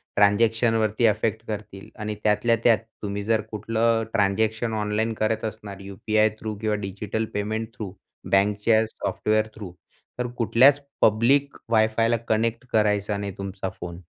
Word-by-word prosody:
ट्रान्झॅक्शनवरती 110 +2 +3
affect 110 +1 0
करतील 105 -2 -7
आणि 105 0 -3
त्यातल्या 105 +2 +3
त्यात 115 -2 +6 0.2
तुम्ही 100 0 -3
जर 110 0 +1
कुठलं 115 +2 +1
ट्रान्झॅक्शन 110 +2 +1
ऑनलाईन 105 +2 0
करत 110 +1 -1
असणार 105 -2 -7
यु-पी-आय 110 +2 +1
थ्रू 110 -1 -4
किंवा 110 -1 +1
डिजिटल 105 +3 -3
पेमेंट 110 +2 -2
थ्रू 105 -6 -6 0.4
बँकच्या 105 +3 +3
सॉफ्टवेअर 110 0 -1
थ्रू 100 -5 -8 0.5
तर 125 - 0
कुठल्याच 130 +5 +5 0.2
पब्लिक 130 +6 +3 0.2
वायफायला 115 +1 +3
कनेक्ट 115 +3 0
करायचा 105 -1 +2
नाही 100 -1 -4
तुमचा 95 -1 -4
फोन 85 -1 -7
110 Hz, 130 wpm, -24 LUFS, 105-115 Hz, 0.5 s, त्यात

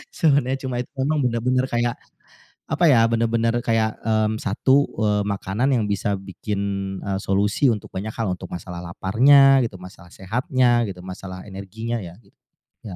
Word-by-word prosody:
sebenernya 140 -4 +2
cuma 125 -2 -3
itu - - -10
emang 150 +3 +1
bener-bener 125 +2 +1
kayak, 120 0 0 0.8
apa 175 - +2
ya, 115 -4 +5
bener-bener 115 0 +1
kayak, 110 -1 0
mmm, 110 0 +1
satu, 130 +8 +2
eee, 105 -1 +2
makanan 100 +6 -1
yang 110 -3 +1
bisa 100 0 -1
bikin, 100 +1 -5 0.4
eee, 95 -1 -2
solusi 100 +7 +1
untuk 105 - -7
banyak 105 +4 -4
hal, 110 -5 -1
untuk - - -9
masalah 90 0 -7
laparnya 135 +10 +5
gitu, 95 - -13
masalah 90 -1 -12
sehatnya 120 +4 +1
gitu, 90 -2 -8
masalah 95 0 -8
energinya 110 +5 -5
ya 85 -1 -9
gitu, - - -28 0.5
ya. 95 -4 -7
110 Hz, 160 wpm, -22 LUFS, 95-125 Hz, 0.8 s, ya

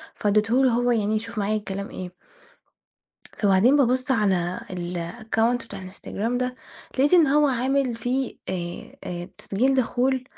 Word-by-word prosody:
فاديته 215 +5 +2
له 255 - +4
هو 245 +1 +2
يعني 215 -2 +1
يشوف 225 +1 -4
معايا 205 +1 0
الكلام 200 -1 -5
إيه 180 -1 -7 1.2
فبعدين 205 +6 +4
ببُص 255 -1 +2
على 190 -6 +1
الaccount 220 +7 -1
بتاع - - -8
الInstagram 220 +5 -3
ده 250 0 -2 0.4
لقيت 280 +5 +2
إن 335 -4 +7
هو 295 +2 +4
عامل 260 0 +1
فيه 250 +3 -2
آآ 175 -2 -5
آآ 175 +1 -5
تسجيل 255 +7 +1
دخول 260 +1 +1
230 Hz, 140 wpm, -24 LUFS, 195-255 Hz, 1.2 s, إن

